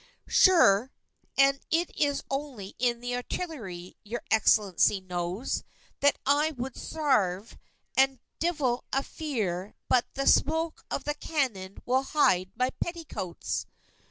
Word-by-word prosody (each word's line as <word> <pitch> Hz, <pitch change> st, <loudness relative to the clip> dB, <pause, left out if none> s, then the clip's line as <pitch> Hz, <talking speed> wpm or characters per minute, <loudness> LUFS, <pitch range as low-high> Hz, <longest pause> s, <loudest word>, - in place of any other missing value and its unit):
Sure, 265 Hz, -, +5 dB, 0.5 s
and 275 Hz, 0 st, +5 dB
it 335 Hz, +2 st, 0 dB
is 285 Hz, -1 st, 0 dB
only 270 Hz, -8 st, -5 dB
in 240 Hz, -1 st, +1 dB
the 245 Hz, 0 st, -2 dB
artillery, 235 Hz, -, -5 dB
your 230 Hz, +3 st, -5 dB
Excellency 210 Hz, -3 st, +4 dB
knows, 180 Hz, +4 st, -3 dB, 0.4 s
that 285 Hz, 0 st, +4 dB
I 295 Hz, +3 st, +3 dB
would 255 Hz, +1 st, -4 dB
sarve, 225 Hz, -, 0 dB, 0.4 s
and 270 Hz, 0 st, +4 dB, 0.2 s
divil 295 Hz, -8 st, 0 dB
a 270 Hz, -, +1 dB
fear 210 Hz, -, -3 dB
but 250 Hz, -2 st, +3 dB
the 275 Hz, 0 st, -1 dB
smoke 320 Hz, +1 st, +2 dB
of -, -, -3 dB
the 295 Hz, -, -1 dB
cannon 255 Hz, -12 st, -3 dB
will 260 Hz, +2 st, +2 dB
hide 190 Hz, -11 st, +2 dB
my 255 Hz, +2 st, +1 dB
petticoats!" 325 Hz, -, -4 dB
255 Hz, 125 wpm, -28 LUFS, 200-295 Hz, 0.5 s, Sure